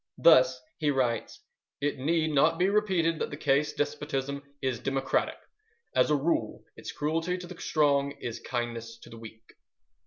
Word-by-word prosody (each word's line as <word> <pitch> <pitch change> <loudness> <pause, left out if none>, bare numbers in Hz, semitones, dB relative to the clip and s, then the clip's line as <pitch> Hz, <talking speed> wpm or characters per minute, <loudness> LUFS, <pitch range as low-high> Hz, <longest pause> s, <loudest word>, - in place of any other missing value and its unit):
Thus - - +6 0.2
he 150 - +1
writes: 125 -5 -1 0.4
"It 145 -1 -1
need 160 +3 +1
not 155 +3 +3
be 185 +2 +3
repeated 185 -6 +1
that - - -2
the 145 - -7
case 145 0 +2
despotism 140 -1 -2 0.2
is 130 -4 -2
democratic. 135 0 -1 0.6
As - - +4
a 150 - +4
rule 150 +4 -1
its - - -7
cruelty 165 +4 -1
to 180 - -8
the 175 0 -10
strong 140 -2 +2
is 120 -1 -5
kindness 115 -2 -4
to - - -13
the 115 - -10
weak." 110 0 -13
145 Hz, 160 wpm, -28 LUFS, 130-165 Hz, 0.6 s, Thus